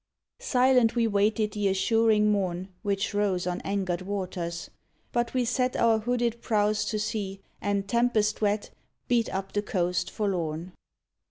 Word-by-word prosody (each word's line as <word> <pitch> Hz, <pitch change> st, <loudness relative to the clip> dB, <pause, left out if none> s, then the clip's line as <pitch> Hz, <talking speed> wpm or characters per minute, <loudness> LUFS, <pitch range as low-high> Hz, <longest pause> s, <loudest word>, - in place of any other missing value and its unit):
Silent, 255 Hz, -, +3 dB
we 235 Hz, -1 st, +3 dB
waited 210 Hz, 0 st, +1 dB
the 205 Hz, -1 st, 0 dB
assuring 210 Hz, +2 st, +3 dB
morn. 185 Hz, -2 st, -1 dB
Which 200 Hz, 0 st, -1 dB
rose 200 Hz, -4 st, +1 dB
on 180 Hz, 0 st, -2 dB
angered 190 Hz, -3 st, -2 dB
waters. 180 Hz, -3 st, -4 dB, 0.4 s
But 240 Hz, +1 st, -1 dB
we 250 Hz, -1 st, +2 dB
set 250 Hz, +1 st, 0 dB
Our 225 Hz, -1 st, +3 dB
hooded 235 Hz, 0 st, -1 dB
prows 210 Hz, -1 st, +1 dB
to 215 Hz, -, -1 dB
sea, 210 Hz, -2 st, -3 dB, 0.2 s
and, 200 Hz, -1 st, -1 dB
tempest 235 Hz, -2 st, +1 dB
wet, 205 Hz, 0 st, 0 dB, 0.4 s
Beat 235 Hz, -2 st, +1 dB
up 195 Hz, 0 st, -3 dB
the 205 Hz, -, +1 dB
coast 180 Hz, -4 st, -1 dB
forlorn. 175 Hz, -4 st, -2 dB
210 Hz, 145 wpm, -27 LUFS, 190-230 Hz, 0.4 s, Silent